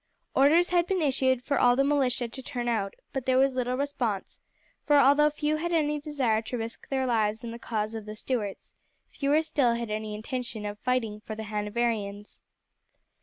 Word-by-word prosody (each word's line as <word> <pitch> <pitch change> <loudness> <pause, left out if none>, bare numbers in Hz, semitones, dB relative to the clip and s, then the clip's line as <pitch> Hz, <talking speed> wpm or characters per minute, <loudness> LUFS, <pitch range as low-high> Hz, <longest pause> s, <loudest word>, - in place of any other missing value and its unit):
Orders 315 +6 +5
had 350 -1 +2
been 380 0 +1
issued 260 -4 +1
for 280 -1 0
all 245 0 +5
the 275 - +3
militia 270 -4 +1
to 250 +3 -8
turn 245 -2 -4
out, 210 -4 -1 0.2
but 270 -1 -3
there 255 0 +4
was 270 0 +4
little 250 0 -1
response, 250 -8 -2 0.4
for 295 - +3
although 285 +2 +6
few 300 +1 -1
had 345 +2 -2
any 300 -3 +1
desire 265 -8 0
to 230 +2 -4
risk 225 0 -7
their 265 -1 0
lives 220 -2 +1
in 235 - -5
the 235 - -8
cause 215 -2 -2
of 220 -2 -6
the 215 - -6
Stuarts, 215 -3 -4 0.4
fewer 295 +2 +2
still 265 -7 +2
had 235 -2 -4
any 215 0 -3
intention 235 -1 -5
of 205 0 -5
fighting 225 -4 -1
for 215 - -6
the 220 - -6
Hanoverians. 210 -1 -2
245 Hz, 190 wpm, -28 LUFS, 220-280 Hz, 0.4 s, although